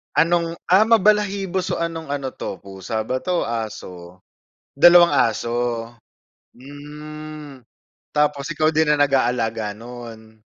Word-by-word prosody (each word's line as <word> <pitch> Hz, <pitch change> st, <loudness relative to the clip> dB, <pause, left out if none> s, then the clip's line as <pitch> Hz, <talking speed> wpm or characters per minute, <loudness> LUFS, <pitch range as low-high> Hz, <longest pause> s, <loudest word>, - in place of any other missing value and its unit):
Anong, 170 Hz, 0 st, +2 dB, 0.2 s
ah, 210 Hz, +4 st, +6 dB
mabalahibo 200 Hz, -3 st, +2 dB
so 180 Hz, -, -2 dB
anong 165 Hz, -2 st, -4 dB
ano 140 Hz, -2 st, -3 dB
'to -, -, -6 dB
pusa 100 Hz, +3 st, -5 dB
ba 130 Hz, +3 st, -2 dB
'to, 175 Hz, +6 st, -1 dB
aso? 95 Hz, -6 st, -7 dB, 0.5 s
Dalawang 175 Hz, +2 st, +7 dB
aso, 120 Hz, -1 st, 0 dB, 0.7 s
hmm, 150 Hz, 0 st, -10 dB, 0.5 s
tapos 150 Hz, -1 st, 0 dB
ikaw 155 Hz, 0 st, +1 dB
din 160 Hz, -1 st, +2 dB
ang 150 Hz, -, +3 dB
nag-aalaga 120 Hz, -6 st, 0 dB
no'n? 115 Hz, -2 st, -11 dB
140 Hz, 115 wpm, -21 LUFS, 115-165 Hz, 0.7 s, Dalawang